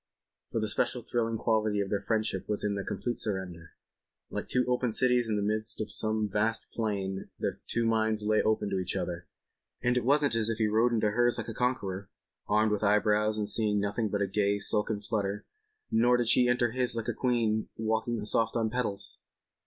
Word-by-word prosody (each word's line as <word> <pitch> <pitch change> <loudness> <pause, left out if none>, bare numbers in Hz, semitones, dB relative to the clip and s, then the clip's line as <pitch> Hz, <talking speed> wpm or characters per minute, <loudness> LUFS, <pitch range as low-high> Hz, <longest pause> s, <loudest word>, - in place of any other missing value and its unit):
For 115 - -1
the 110 - -1
special 120 +3 -1
thrilling 115 -1 -1
quality 110 -2 +1
of 100 -1 -2
their 100 -1 0
friendship 110 -2 -2
was 105 - 0
in 105 -1 0
their 100 -1 -3
complete 105 +5 -3
surrender. 90 -6 -3 0.6
Like - - -4
two 125 -1 +1
open 125 -1 +1
cities 125 0 +2
in 110 - +1
the 105 - -1
midst 110 +1 -1
of 105 -1 -3
some 110 +1 +1
vast 110 +3 0
plain 100 -4 -3
their - - -3
two 115 0 0
minds 110 -1 +1
lay 110 0 +3
open 110 -2 0
to 95 - 0
each 90 - -2
other. - - -4 0.6
And 120 0 +2
it 125 - +1
wasn't 145 0 +3
as 115 -1 +2
if 115 - -1
he 110 - +1
rode 110 +3 +2
into 110 -2 +1
hers 120 +2 +3
like - - -4
a - - -4
conqueror, 100 -6 -2 0.4
armed 105 +1 +2
to 105 - +1
the 105 - +1
eyebrows 105 +1 +2
and 105 -1 -1
seeing 105 -2 +2
nothing 100 +2 -1
but 100 0 0
a - - -1
gay 100 +1 +1
silken 105 0 +1
flutter—nor 115 - -1
did 120 -2 0
she 125 - +5
enter 120 -1 +2
his 125 -1 0
like 115 -2 -3
a - - 0
queen 115 -4 0
walking 110 0 -1
soft 115 +1 +2
on 115 -2 0
petals. 100 -6 -3
110 Hz, 205 wpm, -29 LUFS, 105-115 Hz, 0.6 s, she